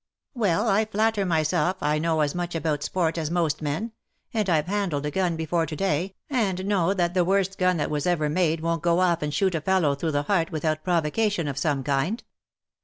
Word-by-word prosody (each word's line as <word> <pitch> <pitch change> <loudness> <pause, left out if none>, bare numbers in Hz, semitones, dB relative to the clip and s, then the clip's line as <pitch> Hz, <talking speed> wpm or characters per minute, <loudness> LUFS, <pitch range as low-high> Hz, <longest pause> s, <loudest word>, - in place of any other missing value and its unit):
" - - -65
Well^ 210 -3 +1
I 215 0 +3
flatter 215 -1 0
myself 175 +3 +1
I 150 +1 +1
know 160 0 +1
as 145 -1 +1
much 175 -1 -3
about 155 -2 -1
sport 165 +1 -1
as 155 -2 -2
most 165 -4 0
men; 155 +10 -2 0.4
and 215 -3 0
Fve 155 -4 +2
handled 180 -7 -1
a 150 - -2
gun 180 0 0
before 160 +1 -1
to 155 - -5
day, 190 +2 -1
and 195 -9 -1
know 195 -2 +1
that 175 -2 0
the 180 -1 +3
worst 195 +1 0
gun 185 -1 +3
that 145 - -2
was 150 +2 -1
ever 165 -4 +1
made 165 0 +1
won't 165 -1 -1
go 170 +1 +2
off 175 -2 +2
and 150 0 -2
shoot 190 +5 +1
a 165 - -1
fellow 180 -4 +2
through 155 +3 -2
the 145 0 +1
heart 170 0 0
without 155 -1 -1
provocation 175 +1 0
of 140 -1 -3
some 140 -2 0
kind." 145 - -1
170 Hz, 220 wpm, -25 LUFS, 155-190 Hz, 0.4 s, I